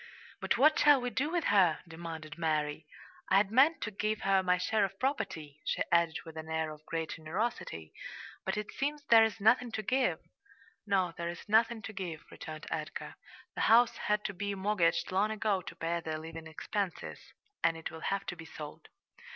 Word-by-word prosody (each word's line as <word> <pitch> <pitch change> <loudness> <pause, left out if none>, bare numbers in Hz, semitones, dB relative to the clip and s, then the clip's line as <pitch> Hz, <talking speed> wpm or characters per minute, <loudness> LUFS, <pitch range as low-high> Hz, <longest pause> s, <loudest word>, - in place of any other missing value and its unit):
"But - - 0
what 305 +3 +5
shall 290 -2 +7
we 245 0 -3
do 275 +6 0
with 345 0 0
her?" 185 -6 +4
demanded 165 -2 -7
Mary. 155 -2 -1 0.4
"I 190 - +5
had 200 0 +3
meant 275 +8 +5
to 210 - -3
give 215 +2 -1
her 195 0 +3
my 180 -1 +2
share 205 +4 +1
of 195 -1 -1
the - - -33
property," 165 - -3
she - - 0
added 170 -1 +3
with 160 -1 -10
an 160 0 -7
air 160 -1 -1
of 150 0 -11
great 165 -1 -2
generosity, 160 - -4 0.5
"but - - -2
it 210 0 -4
seems 290 +2 -2
there's 225 -1 +6
nothing 235 +3 +4
to 215 - -2
give." 260 +5 +1 0.7
"No, 190 -4 +2
there's 170 0 -5
nothing 225 +1 +3
to 220 - -6
give," 175 -5 -5
returned 155 0 -8
Edgar. - - -4 0.4
"The - - -3
house 235 +1 +5
had 210 0 0
to 195 - -2
be 200 +2 -3
mortgaged 190 -5 +1
long 195 +3 +2
ago 215 -3 0
to - - -9
pay 170 +1 -1
their 160 -1 -4
living 160 0 -8
expenses, 180 +3 -4 0.4
and 165 -1 +3
it 165 - -5
will 160 0 -9
have 195 0 -1
to - - -4
be 165 -1 -10
sold." 150 -2 -9
190 Hz, 190 wpm, -32 LUFS, 160-220 Hz, 0.7 s, shall